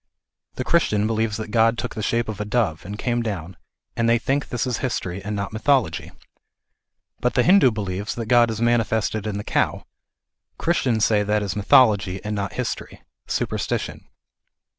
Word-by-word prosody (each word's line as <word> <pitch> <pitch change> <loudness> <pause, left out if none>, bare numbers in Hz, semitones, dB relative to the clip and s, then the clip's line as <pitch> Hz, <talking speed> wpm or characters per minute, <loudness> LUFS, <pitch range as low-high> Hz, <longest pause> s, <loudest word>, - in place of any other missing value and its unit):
The 130 - -3
Christian 110 -9 +2
believes 110 -1 0
that 110 -1 -6
God 115 +1 +3
took - - -4
the 110 - -5
shape 115 +2 0
of 105 -1 -5
a - - 0
dove, 105 -7 -1
and 100 +2 -6
came 120 +1 -1
down, 95 -6 -4 0.4
and 115 0 +1
they 115 - +5
think 135 +5 -1
this 125 - -1
is 125 -3 -2
history, 95 -7 -3
and 105 +1 -3
not 100 +1 -4
mythology. 110 - +1 1.1
But 125 - 0
the - - +4
Hindu 185 -6 +6
believes 100 -1 -4
that 115 - -4
God 120 +1 +4
is 110 -1 -3
mani 120 0 +3
fested 110 -1 -2
in 100 -1 -3
the 105 - -4
cow. - - 0 0.7
Christians 125 -10 +1
say 105 -2 +3
that 105 +1 0
is 100 - -3
mythology, 105 -3 +4
and 105 - -2
not 100 -1 -3
history: - - -5 0.2
superstition. - - -3
110 Hz, 180 wpm, -23 LUFS, 105-120 Hz, 1.1 s, Hindu